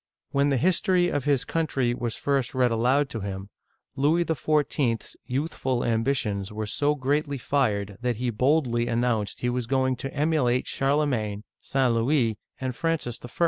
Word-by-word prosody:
When 140 Hz, +1 st, +2 dB
the 135 Hz, -, +2 dB
history 180 Hz, -, +2 dB
of 145 Hz, -5 st, -2 dB
his 140 Hz, -3 st, +2 dB
country 135 Hz, -7 st, 0 dB
was 120 Hz, -2 st, -3 dB
first 140 Hz, -3 st, -1 dB
read 125 Hz, -2 st, +3 dB
aloud 125 Hz, +5 st, +2 dB
to 115 Hz, -, -4 dB
him, 95 Hz, 0 st, -6 dB, 0.4 s
Louis 155 Hz, +5 st, +2 dB
XIV.*s 145 Hz, -6 st, 0 dB
youthful 130 Hz, -2 st, -1 dB
ambitions 110 Hz, -4 st, 0 dB
were 110 Hz, 0 st, -3 dB
so 145 Hz, +8 st, +1 dB
greatly 145 Hz, +1 st, 0 dB
fired 105 Hz, -7 st, 0 dB
that 125 Hz, -1 st, 0 dB
he 120 Hz, +2 st, -1 dB
boldly 125 Hz, -1 st, +2 dB
announced 115 Hz, -3 st, 0 dB
he 125 Hz, -, +1 dB
was 125 Hz, -1 st, -2 dB
going 130 Hz, 0 st, +1 dB
to 135 Hz, +2 st, -5 dB
emulate 140 Hz, -5 st, +1 dB
Charlemagne, 135 Hz, -8 st, 0 dB, 0.2 s
St. 130 Hz, -3 st, +1 dB
Louis, 115 Hz, -2 st, +1 dB, 0.2 s
and 130 Hz, -2 st, -3 dB
Francis 160 Hz, -8 st, -1 dB
I.! 120 Hz, -, -7 dB
130 Hz, 155 wpm, -26 LUFS, 115-145 Hz, 0.4 s, read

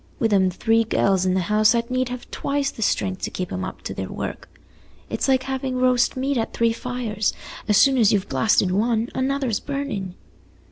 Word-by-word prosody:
Wi' 230 Hz, -, +3 dB
them 190 Hz, -3 st, +3 dB
three 225 Hz, +5 st, +2 dB
gells 195 Hz, -4 st, +1 dB
in 185 Hz, -, +2 dB
the 190 Hz, -, +1 dB
house 215 Hz, +4 st, +3 dB
I'd 235 Hz, +1 st, -1 dB
need 255 Hz, 0 st, 0 dB
have 250 Hz, 0 st, -7 dB
twice 280 Hz, -1 st, -1 dB
the -, -, -10 dB
strength 190 Hz, -2 st, 0 dB
to -, -, -2 dB
keep 180 Hz, -1 st, -5 dB
'em 185 Hz, -, -3 dB
up 185 Hz, -, -7 dB
to -, -, -4 dB
their -, -, -5 dB
work. -, -, -6 dB, 0.6 s
It's -, -, -1 dB
like 260 Hz, -1 st, +3 dB
having 265 Hz, -1 st, -3 dB
roast 255 Hz, 0 st, +2 dB
meat 270 Hz, +1 st, 0 dB
at 225 Hz, -, -3 dB
three 230 Hz, -1 st, +2 dB
fires; 230 Hz, -4 st, -2 dB, 0.3 s
as 210 Hz, -2 st, +4 dB
soon 270 Hz, -2 st, +5 dB
as 220 Hz, -2 st, +5 dB
you've 205 Hz, -3 st, +1 dB
basted 200 Hz, -4 st, +2 dB
one, 225 Hz, +3 st, +1 dB
another's 260 Hz, -4 st, -1 dB
burnin'." 270 Hz, -11 st, -4 dB
230 Hz, 200 wpm, -23 LUFS, 200-255 Hz, 0.6 s, soon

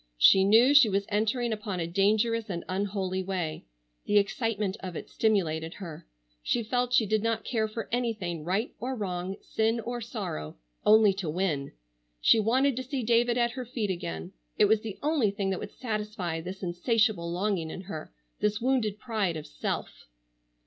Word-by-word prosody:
She 190 Hz, -, +7 dB
knew 225 Hz, +7 st, +6 dB
she 280 Hz, -6 st, +8 dB
was 200 Hz, 0 st, 0 dB
entering 225 Hz, +3 st, 0 dB
upon 210 Hz, -4 st, -4 dB
a 165 Hz, -, -1 dB
dangerous 215 Hz, +5 st, +1 dB
and 170 Hz, -3 st, -4 dB
unholy 190 Hz, -1 st, -1 dB
way. 180 Hz, -, -3 dB, 0.4 s
The 205 Hz, -, +3 dB
excitement 205 Hz, -1 st, 0 dB
of 185 Hz, -2 st, -6 dB
it -, -, -7 dB
stimulated 165 Hz, -7 st, 0 dB
her. 165 Hz, -, -9 dB, 0.3 s
She 235 Hz, -, 0 dB
felt 245 Hz, +2 st, 0 dB
she 245 Hz, -3 st, +4 dB
did 215 Hz, +1 st, +1 dB
not 225 Hz, 0 st, 0 dB
care 220 Hz, -3 st, 0 dB
for 215 Hz, 0 st, -5 dB
anything, 215 Hz, -9 st, -2 dB
right 195 Hz, +8 st, -1 dB
or 260 Hz, +2 st, -3 dB
wrong, 185 Hz, -3 st, -3 dB
sin 225 Hz, +1 st, 0 dB
or 240 Hz, +2 st, -4 dB
sorrow, 200 Hz, -, -5 dB, 0.3 s
only 215 Hz, -1 st, +6 dB
to 190 Hz, -4 st, -4 dB
win. 155 Hz, -5 st, -1 dB, 0.5 s
She 220 Hz, -, +5 dB
wanted 255 Hz, +5 st, +2 dB
to 260 Hz, -, -2 dB
see 260 Hz, -1 st, -3 dB
David 235 Hz, +1 st, +3 dB
at 240 Hz, -1 st, +2 dB
her 255 Hz, +1 st, -5 dB
feet 225 Hz, -4 st, -2 dB
again. 85 Hz, -, -5 dB, 0.2 s
It -, -, +6 dB
was 215 Hz, +1 st, +3 dB
the 215 Hz, -3 st, -6 dB
only 295 Hz, -8 st, +2 dB
thing 195 Hz, -1 st, -2 dB
that 190 Hz, -, -2 dB
would -, -, -8 dB
satisfy 210 Hz, -8 st, -3 dB
this 185 Hz, +3 st, -7 dB
insatiable 180 Hz, 0 st, +1 dB
longing 180 Hz, -2 st, -1 dB
in 180 Hz, -, -6 dB
her, 175 Hz, -, -7 dB, 0.3 s
this 210 Hz, +1 st, +1 dB
wounded 240 Hz, -5 st, +1 dB
pride 210 Hz, -7 st, -1 dB
of 155 Hz, -, -7 dB
self. -, -, -5 dB
210 Hz, 175 wpm, -28 LUFS, 185-230 Hz, 0.5 s, she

